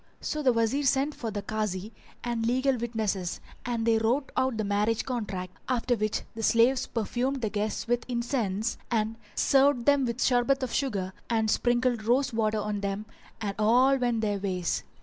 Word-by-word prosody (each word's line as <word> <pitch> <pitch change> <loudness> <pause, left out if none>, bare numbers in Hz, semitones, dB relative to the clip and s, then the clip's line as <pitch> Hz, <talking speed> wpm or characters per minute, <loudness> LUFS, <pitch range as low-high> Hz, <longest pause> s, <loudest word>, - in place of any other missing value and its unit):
So 305 - -3
the 265 -3 +4
Wazir 230 +4 +1
sent 275 +2 +2
for 230 - -5
the 205 -1 -4
Kazi 210 -1 -3 0.3
and 235 -2 -1
legal 260 +3 +2
witnesses 220 -6 -2 0.3
and 235 -2 -1
they 225 -1 +4
wrote 250 +5 0
out 260 -3 +1
the 215 - 0
marriage 210 +2 +1
contract, 195 -8 -4
after 250 -1 +1
which 215 -1 -1
the 225 - -6
slaves 235 +4 +3
perfumed 245 +3 -2
the 215 - 0
guests 210 +1 -2
with 240 0 +1
incense, 235 -4 -1
[FN#381] 235 - +2
and 220 +1 -1 0.2
served 270 -3 +3
them 285 -2 +4
with 235 +2 -1
sherbet 260 +2 +2
of 250 - -3
sugar 200 -9 -1 0.2
and 220 -2 +2
sprinkled 240 -1 +1
rose 250 +3 +2
water 220 -1 +1
on 210 0 -2
them 200 +1 -3 0.4
and 205 -2 -2
all 250 +5 +5
went 240 -3 0
their 205 -2 0
ways. 185 -3 -1
230 Hz, 180 wpm, -28 LUFS, 215-255 Hz, 0.4 s, all